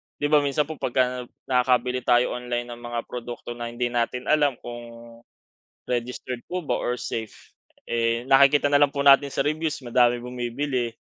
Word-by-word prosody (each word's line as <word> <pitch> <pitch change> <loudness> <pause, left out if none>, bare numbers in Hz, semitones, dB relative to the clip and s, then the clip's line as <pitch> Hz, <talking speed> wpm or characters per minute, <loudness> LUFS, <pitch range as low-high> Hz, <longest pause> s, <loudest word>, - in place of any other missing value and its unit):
'Di 145 0 -2
ba, 150 - +7
minsan 145 +1 +1
po 155 +1 -8
pagka 125 0 0 0.2
nakabili 125 -1 +1
tayo 120 0 +3
online 120 0 -4
ng 120 - -8
mga 120 0 -4
produkto 120 0 -7
na 120 0 -5
hindi 120 +1 -2
natin 120 +1 -1
alam 145 -4 +3
kung 120 -1 -10 0.7
registered 125 0 -4
po 180 -1 -4
ba - - -1
or 125 0 -1
safe, 110 -2 -6 0.3
eh, 115 0 0
nakikita 140 +2 +5
na 145 - +5
lang 145 - +6
po 140 0 -2
natin 140 0 +7
sa 135 - -1
reviews 155 +1 -1
madami 120 0 +3
bumibili. 125 +1 -3
125 Hz, 170 wpm, -24 LUFS, 120-140 Hz, 0.7 s, ba